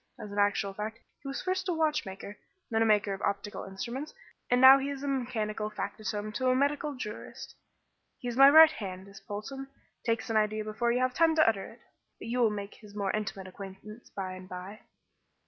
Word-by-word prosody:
As 210 - -8
an 205 - -3
actual 205 -1 +1
fact 215 +3 -5 0.2
he - - -9
was 275 - -4
first 370 0 -1
a - - +2
watchmaker, 210 -11 -2 0.4
then 225 0 +2
a 225 - +4
maker 210 -2 +3
of 195 - -7
optical 200 +1 -2
instruments, 240 - -6 0.3
and 245 - +4
now 265 +1 +10
he 275 +1 -2
is 280 -1 -5
mechanical 230 -6 -2
factotum 210 0 -4
to 255 +4 -1
a 255 - +3
medical 285 +2 0
jurist. 215 -4 -8 0.6
He 245 - -7
is 240 - -3
my 275 +2 +9
right 315 +1 +9
hand, 190 -6 -7
is 195 0 -12
Polton; 215 +8 -6 0.4
takes 230 0 -1
an 220 - +2
idea 215 0 +1
before 220 +3 -1
you 250 +1 +1
have 255 0 +1
time 325 +1 +3
to 315 - +5
utter 200 -4 +1
it - - -21 0.4
but - - -8
you 245 +2 -1
will 235 -2 +5
make 205 -1 -5
his 210 -2 -15
more 200 -2 -1
intimate 200 -2 -3
acquaintance 195 +4 -10
by 190 -2 -5
and 185 0 -10
by." 185 +4 -8
215 Hz, 205 wpm, -30 LUFS, 200-260 Hz, 0.6 s, now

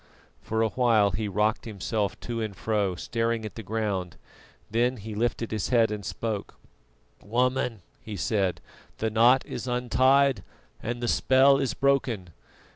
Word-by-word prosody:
For 110 0 -1
a 110 - +1
while 110 -3 +3
he 105 +3 -2
rocked 105 +2 0
himself 105 -1 -2
to 115 -1 -4
and 105 -3 -4
fro, 100 -3 0
staring 115 +3 -2
at 110 - -6
the 115 - -7
ground, 100 -4 -3 0.5
then 120 +3 +1
he 110 +1 -7
lifted 115 +1 -1
his 110 -2 -2
head 115 -3 +3
and 105 -1 -4
spoke: 105 +2 -4 0.7
"Woman," 125 -2 0 0.2
he 110 - -7
said, 95 +1 0 0.4
"the 110 0 -1
knot 120 +4 +5
is - - -6
untied 130 0 +3 0.4
and 120 +2 -4
the - - 0
spell 135 +3 +4
is 135 -3 -1
broken. 130 -9 +1
110 Hz, 150 wpm, -27 LUFS, 105-125 Hz, 0.7 s, knot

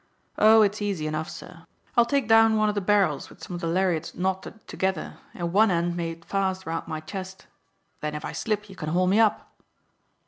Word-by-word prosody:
Oh, 220 +1 +7
it's 210 +1 0
easy 195 -7 -2
enough, 155 +1 -3
sir. - - -11 0.3
I'll 235 - +5
take 275 -2 +1
down 225 0 +5
one 215 0 +3
of - - 0
the 205 - -1
barrels 195 -7 +1
with - - -16
some - - -7
of 175 - -5
the 165 - -2
lariats 170 -2 0
knotted 190 +4 -3
together 190 0 -3 0.2
and 170 -1 -3
one 215 +2 +5
end 170 -1 0
made 165 -1 -5
fast 190 -1 -1
round 165 0 -4
my 155 - -4
chest. 190 +4 -8 0.5
Then 150 0 -4
if 150 - -5
I - - -4
slip 210 -2 -2
you 195 - -12
can 155 -4 -5
haul 180 +3 +2
me 195 +4 +3
up." 220 -2 +1
190 Hz, 210 wpm, -25 LUFS, 170-210 Hz, 0.5 s, Oh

